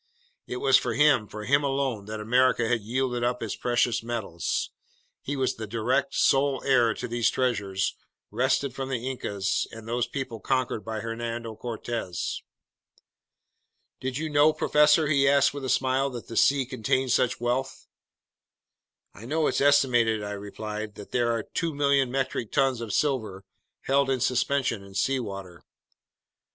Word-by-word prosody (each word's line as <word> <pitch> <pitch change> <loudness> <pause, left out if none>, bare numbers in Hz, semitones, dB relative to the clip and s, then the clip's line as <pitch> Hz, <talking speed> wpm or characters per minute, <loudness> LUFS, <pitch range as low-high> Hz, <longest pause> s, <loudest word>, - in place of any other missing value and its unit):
It 125 - -4
was 135 0 +5
for 120 -2 -2
him, 140 -6 +4
for 105 +1 -8
him 140 +4 +3
alone, 135 -6 -1
that 110 +1 -6
America 120 +1 +2
had 120 -1 +1
yielded 125 +2 -1
up 125 0 -1
its 110 - -3
precious 120 -1 +1
metals. 115 -8 -3 0.5
He 145 - -4
was 130 -2 0
the 110 -1 -5
direct, 125 +6 0
sole 135 -1 +3
heir 120 -4 +3
to 125 - -5
these 120 -1 +1
treasures 100 -7 -1 0.4
wrested 140 -3 +1
from 135 0 -5
the 125 -1 -3
Incas 100 -7 -2
and 115 0 -10
those 120 +1 -1
peoples 120 -4 -5
conquered 130 -4 0
by 110 -1 -4
Hernando 115 0 -4
Cortez! 115 -5 -4 1.6
"Did 130 0 -3
you 160 +1 -2
know, 150 +1 +5
professor," 150 0 +4
he 140 -2 +3
asked 140 0 +4
me 145 - -5
with 135 - -6
a - - -3
smile, 130 +2 +1
"that 120 -3 -8
the 115 - -8
sea 135 +3 +4
contained 130 +1 -1
such 125 0 +2
wealth?" 125 +3 -2 1.3
"I 115 - -11
know 155 +3 +1
it's - - +1
estimated," 120 -6 +3
I 105 - -4
replied, 105 +1 -6
"that 105 - -11
there 120 -1 +1
are 115 -2 -1
2,000,000 140 -5 +1
metric 130 -4 -2
tons 135 -4 +1
of 115 -3 -5
silver 110 -8 -1 0.4
held 140 0 +2
in 130 -1 +1
suspension 125 -3 0
in 100 0 -14
seawater." 100 -7 -2
125 Hz, 160 wpm, -26 LUFS, 110-135 Hz, 1.6 s, was